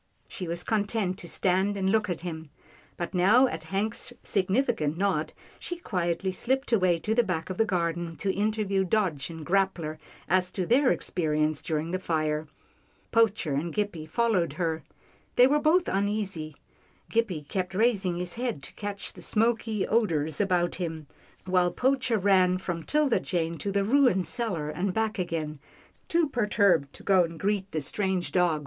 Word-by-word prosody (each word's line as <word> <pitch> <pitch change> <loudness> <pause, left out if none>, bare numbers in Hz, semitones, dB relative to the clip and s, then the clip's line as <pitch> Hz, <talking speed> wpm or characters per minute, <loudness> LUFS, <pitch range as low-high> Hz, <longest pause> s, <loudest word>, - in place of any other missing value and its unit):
She 180 - -5
was 170 +1 -2
content 205 -3 -1
to 175 - -8
stand 190 +3 +1
and 190 -1 0
look 215 -1 +2
at 175 -2 -3
him, 160 -3 -6 0.5
but 175 - -4
now 205 +8 +5
at 160 -11 -4
Hank's 215 +7 -2
significant 190 - 0
nod, 180 -5 0 0.3
she 350 - -4
quietly 180 - -1
slipped 265 +8 -1
away 185 -6 +3
to 210 +7 -1
the 240 - +4
back 180 -5 -3
of 185 - -6
the 225 - +4
garden, 170 -3 -1
to 195 +3 -1
interview 205 -2 0
Dodge 180 -8 0
and 160 -2 -8
Grappler 180 -5 0 0.3
as 185 0 +2
to 185 - -1
their 255 +6 +4
experiences 155 -3 0
during 160 -1 -2
the 185 - -1
fire. 155 -3 -1 0.6
Poacher 220 -9 +2
and 155 +5 -1
Gippie 200 -7 -2
followed 190 - +1
her. 165 -1 -2 0.5
They 245 - +7
were 290 +3 +3
both 320 +4 +3
uneasy. 195 -6 -2 0.6
Gippie 190 -11 0
kept 185 +1 -3
raising 200 -5 +2
his 180 0 -4
head 235 - -3
to - - -9
catch 205 -1 -6
the - - -12
smoky 225 -2 +1
odours 160 -9 +1
about 180 -3 +1
him, 160 -4 -4 0.4
while 180 -1 +3
Poacher 250 +3 +1
ran 185 -2 +4
from 175 -2 -4
'Tilda 295 - +2
Jane 165 -2 -2
to 200 - -2
the 200 0 +1
ruined 240 -6 +3
cellar 175 -11 -1
and 185 +4 -2
back 220 -2 0
again, 160 -4 -3 0.5
too 335 -1 +2
perturbed 200 - +2
to - - -13
go 190 -2 +5
and 165 -1 -6
greet 200 -1 0
the 155 - -1
strange 185 +4 -2
dog. 175 -4 +2
185 Hz, 165 wpm, -27 LUFS, 165-215 Hz, 0.6 s, They